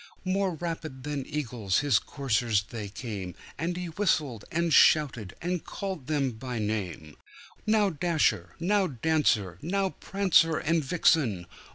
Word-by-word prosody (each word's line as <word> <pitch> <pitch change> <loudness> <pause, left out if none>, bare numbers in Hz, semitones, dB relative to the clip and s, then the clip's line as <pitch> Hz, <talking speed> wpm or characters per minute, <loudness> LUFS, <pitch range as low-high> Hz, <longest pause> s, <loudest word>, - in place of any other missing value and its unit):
More 190 -1 0
rapid 160 -5 -5
than 145 -2 -4
eagles 120 -10 -1
his 140 -7 +3
coursers 120 -6 0
they 105 0 -7
came, 100 -5 -6 0.2
And 175 +3 -2
he 180 - -3
whistled, 155 - 0
and 170 -1 +1
shouted, 125 - +4
and 175 -1 -1
called 190 -9 -5
them 145 -4 +1
by 125 +2 -6
name; 95 -8 -3 0.5
"Now, 215 -2 +3
Dasher! 150 - 0
Now, 195 +3 +2
Dancer! 120 - +1
Now, 190 +3 0
Prancer 180 -5 +2
and 165 +1 +1
Vixen! 135 - +2
145 Hz, 135 wpm, -28 LUFS, 110-170 Hz, 0.5 s, shouted